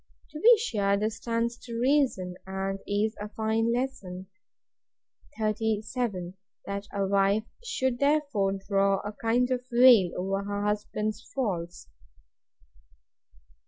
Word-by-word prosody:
To 300 - -7
be 470 +6 +7
sure 200 - 0
this 215 +2 -2
stands 235 +1 -2
to 235 -2 -7
reason, 250 -9 +2
and 195 0 -3
is 210 +2 0
a 210 - -5
fine 220 +2 0
lesson. 235 -8 -3 1.1
37. 215 -3 -1 0.3
That 200 +1 -5
a 200 -1 -1
wife 200 +2 +2 0.2
should 260 - -1
therefore 280 -9 +2
draw 195 -1 +2
a 205 - -5
kind 230 +3 +1 0.2
veil 240 -6 +7
over 195 +2 -1
her 205 0 -3
husband's 210 +1 -2
faults. 175 - -3
215 Hz, 115 wpm, -28 LUFS, 195-240 Hz, 1.1 s, be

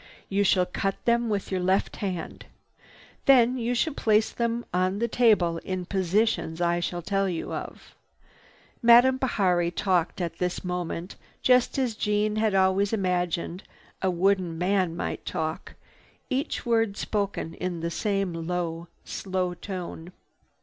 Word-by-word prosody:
You 200 +1 +2
shall 185 -2 +3
cut 195 +2 -2
them 235 0 +2
with 200 -2 -2
your 190 - 0
left 190 +2 +1
hand. 185 -5 -5 0.8
Then 255 -2 +5
you 240 +1 -1
shall 300 +6 +1
place 215 -4 +2
them 235 0 -2
on 185 +2 +1
the 235 +2 0
table 210 -9 +3
in 185 0 -4
positions 190 -2 0
I 175 0 +1
shall 175 0 -3
tell 195 +2 0
you 170 -2 -4
of." - - -7 0.9
Madame 240 +2 +7
Bihari 185 -9 +1
talked 180 -1 0
at 170 -2 -4
this 180 -1 -2
moment 180 0 -4 0.3
just 250 0 +4
as 255 -4 0
Jeanne 210 0 0
had 215 -2 +1
always 190 +2 +3
imagined 180 -3 -1 0.4
a 190 - +2
wooden 180 -1 +1
man 180 -1 +1
might - - -4
talk, 160 0 -4 0.6
each 265 +2 -2
word 225 -3 +1
spoken 200 -6 -2
in 180 -2 -4
the 170 0 -2
same 195 -1 -1
low, 170 -1 -3 0.2
slow 185 -2 -2
tone. 180 -2 -7
190 Hz, 145 wpm, -26 LUFS, 175-220 Hz, 0.9 s, Madame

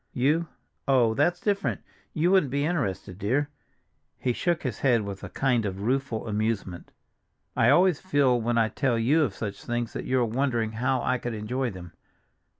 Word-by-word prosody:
"You—oh, 135 -4 0
that's 145 +8 +1
different; 200 -1 -1 0.3
you 170 +4 +1
wouldn't 190 -8 +4
be 140 +1 0
interested, 100 - -2
dear." 135 +8 0 0.7
He 125 - -1
shook 170 +5 -1
his 125 -7 -3
head 120 -4 +3
with 100 -1 -7
a - - -6
kind 125 -4 +1
of 100 -1 -4
rueful 125 -1 -1
amusement. 105 -4 -2 0.6
"I 115 - +4
always 175 +2 +4
feel 140 -9 +2
when 120 +1 0
I 110 -1 +3
tell 130 -2 0
you 135 +8 +3
of 125 -10 0
such 100 -3 -5
things 120 -1 -3
that - - -5
you 130 0 +1
are 120 - +2
wondering 120 -1 0
how 125 +3 0
I 130 -1 +1
could 120 -1 -4
enjoy 125 +5 -2
them. 90 -4 -10
125 Hz, 175 wpm, -26 LUFS, 110-140 Hz, 0.7 s, wouldn't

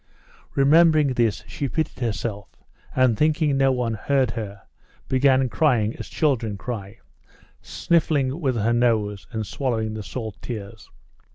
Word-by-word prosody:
Remembering 155 +1 +5
this, 120 -4 0
she 140 - -4
pitied 160 +4 -2
herself, 110 -3 -3 0.5
and, 130 -3 +4
thinking 150 +1 +2
no 135 0 +3
one 125 -3 -1
heard 130 +2 +1
her, 105 -3 -6 0.4
began 130 0 +3
crying 120 -6 +1
as - - -7
children 115 -9 0
cry, 100 -3 -6 0.6
sniffing 150 -4 0
with 130 -5 0
her 115 +1 +1
nose 110 -4 +1
and 110 -2 -3
swallowing 110 -1 -2
the 110 - -5
salt 110 0 -7
tears. 110 -2 -7
120 Hz, 130 wpm, -23 LUFS, 110-140 Hz, 0.6 s, Remembering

